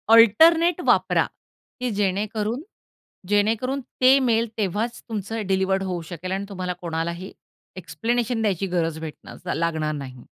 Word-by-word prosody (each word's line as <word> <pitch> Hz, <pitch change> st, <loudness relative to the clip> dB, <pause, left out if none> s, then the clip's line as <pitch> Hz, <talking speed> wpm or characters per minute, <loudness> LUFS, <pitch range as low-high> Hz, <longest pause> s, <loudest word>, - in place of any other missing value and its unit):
Alternate 325 Hz, -, +6 dB
वापरा -, -, +3 dB, 0.5 s
की 250 Hz, 0 st, -1 dB
जेणेकरून 210 Hz, +5 st, -1 dB, 0.7 s
जेणेकरून 225 Hz, +6 st, +1 dB, 0.2 s
ते 260 Hz, +2 st, +7 dB
मेल 230 Hz, +1 st, +2 dB
तेव्हाच 215 Hz, +4 st, -2 dB
तुमचं 220 Hz, +1 st, -3 dB
डिलिव्हर 190 Hz, 0 st, +1 dB
होऊ 180 Hz, -2 st, -3 dB
शकेल 180 Hz, +2 st, -5 dB
आणि 195 Hz, +1 st, -2 dB
तुम्हाला 180 Hz, -2 st, -3 dB
कोणालाही 170 Hz, +2 st, -3 dB, 0.5 s
एक्सप्लेनेशन 225 Hz, +7 st, -1 dB
द्यायची 195 Hz, -3 st, 0 dB
गरज 165 Hz, -3 st, -1 dB
भेटणार 160 Hz, -2 st, -7 dB
लागणार 160 Hz, -2 st, -1 dB
नाही. 130 Hz, -4 st, -8 dB
195 Hz, 120 wpm, -24 LUFS, 170-230 Hz, 0.7 s, ते